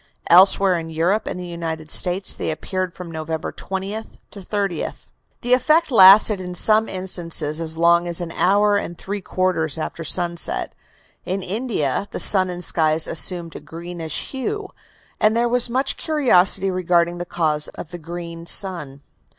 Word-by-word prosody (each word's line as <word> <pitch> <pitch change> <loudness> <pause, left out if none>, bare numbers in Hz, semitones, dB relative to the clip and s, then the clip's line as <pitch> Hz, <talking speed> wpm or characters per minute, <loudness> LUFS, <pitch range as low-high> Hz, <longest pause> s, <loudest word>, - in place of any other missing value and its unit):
Elsewhere 185 0 +6
in 165 0 -8
Europe 170 +7 -1
and - - -5
the 180 - -7
United 165 -2 -6
States 185 +2 +3
they - - -4
appeared 185 +3 -4
from 180 -2 -9
November 160 0 -5
20th 195 +3 -6
to 205 - -10
30th. 195 -3 -4 0.4
The 245 +1 +1
effect 305 +5 +2
lasted 200 -1 +7
in 180 -1 -7
some 215 +4 +3
instances 165 -4 -2
as 160 0 -2
long 170 +1 +3
as 170 0 0
an 175 -2 -5
hour 205 +4 +2
and 175 -4 -5
three 200 +1 -5
quarters 180 -5 -1
after 165 +1 -5
sunset. 170 +1 0 0.5
In 190 +1 -4
India 200 - -2
the - - -6
sun 185 -2 +4
and 180 -1 -6
skies 155 -1 +1
assumed 165 +2 +1
a - - -6
greenish 165 -1 -5
hue, 390 +10 -4 0.5
and 215 +2 +2
there 240 +1 +1
was 245 0 +2
much 260 +3 0
curiosity 195 - +2
regarding 175 -1 0
the - - -3
cause 155 -4 -1
of 155 - -9
the 175 - -8
"green 170 0 -8
sun." 150 -8 0
180 Hz, 160 wpm, -20 LUFS, 165-200 Hz, 0.5 s, lasted